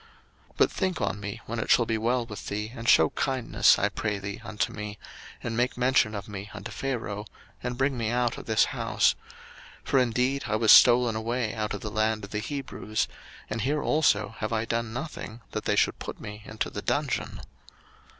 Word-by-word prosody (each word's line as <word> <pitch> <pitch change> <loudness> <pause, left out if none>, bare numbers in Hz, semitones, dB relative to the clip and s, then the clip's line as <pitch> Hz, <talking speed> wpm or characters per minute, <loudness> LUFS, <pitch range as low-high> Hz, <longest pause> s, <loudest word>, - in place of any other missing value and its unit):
01:040:014 - - -32
But - - +4
think 185 -2 -1
on 100 -2 -1
me 100 +3 -6
when 115 +1 -4
it - - -3
shall 120 - +5
be 115 -1 0
well 120 +2 +1
with 105 -3 -8
thee, 105 +2 -3
and 115 0 -2
shew 80 -1 +6
kindness, 130 -3 +3
I 100 - +2
pray 105 0 -2
thee, 100 +1 -6
unto 105 -3 -2
me, 105 -1 -6 0.5
and 115 -1 -3
make 125 +2 0
mention 125 -3 +3
of 100 -1 -5
me 100 -1 -7
unto - - -7
Pharaoh, 110 -6 -3 0.4
and 125 0 -3
bring 135 +1 +1
me 115 -2 0
out 120 0 +1
of - - -11
this - - +4
house: - - +2 0.7
01:040:015 - - -18
For 135 - +4
indeed 125 +3 +1
I 110 - 0
was 110 0 +5
stolen 120 -2 +7
away 115 0 -1
out 105 -1 -2
of 100 - -7
the 105 - -5
land 110 +1 0
of 100 - -8
the 105 - -1
Hebrews: 125 -4 -3 0.4
and 110 +1 -3
here 145 +5 0
also 110 -9 +2
have 110 - -2
I 115 0 0
done 115 0 -2
nothing 120 -3 -6
that - - -4
they - - +2
should - - +2
put - - -6
me 105 0 -8
into 110 - -3
the - - -5
dungeon. - - -1
110 Hz, 210 wpm, -27 LUFS, 105-125 Hz, 0.7 s, stolen